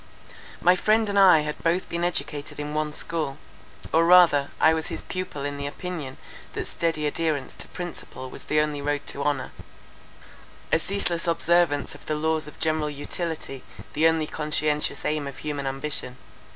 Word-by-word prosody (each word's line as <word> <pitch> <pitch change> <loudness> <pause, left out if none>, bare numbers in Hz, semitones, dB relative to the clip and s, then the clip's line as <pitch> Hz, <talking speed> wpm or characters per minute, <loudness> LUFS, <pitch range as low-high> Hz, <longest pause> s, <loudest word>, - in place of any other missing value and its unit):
My 180 +1 +6
friend 215 +4 +3
and 200 0 +2
I 180 -5 +8
had 150 0 -4
both 170 +3 +1
been 170 0 -2
educated 150 -5 -2
in 150 0 -4
one 155 0 0
school, 155 -3 -1 0.6
or 165 +1 +5
rather 165 -5 +6
I 160 - +6
was 160 0 -2
his - - -3
pupil 185 -6 -4
in 145 0 -3
the 140 0 -3
opinion, 150 -4 -5 0.4
that - - -3
steady 165 -2 -1
adherence 150 -3 -1
to - - -7
principle 170 -7 -7
was - - -10
the 150 0 +3
only 150 -1 -1
road 145 0 -1
to 140 - -4
honour; 145 0 -1 1.2
a 160 - +4
ceaseless 175 -2 0
observance 170 -3 +2
of 145 - -13
the 155 - 0
laws 160 0 0
of 150 - -12
general 155 -1 +1
utility, 145 -1 -4 0.3
the 160 +2 +4
only 160 -1 +2
conscientious 150 -1 -1
aim 150 -2 0
of 140 -1 -7
human 145 -2 -3
ambition. 135 -2 -3
155 Hz, 170 wpm, -25 LUFS, 145-170 Hz, 1.2 s, I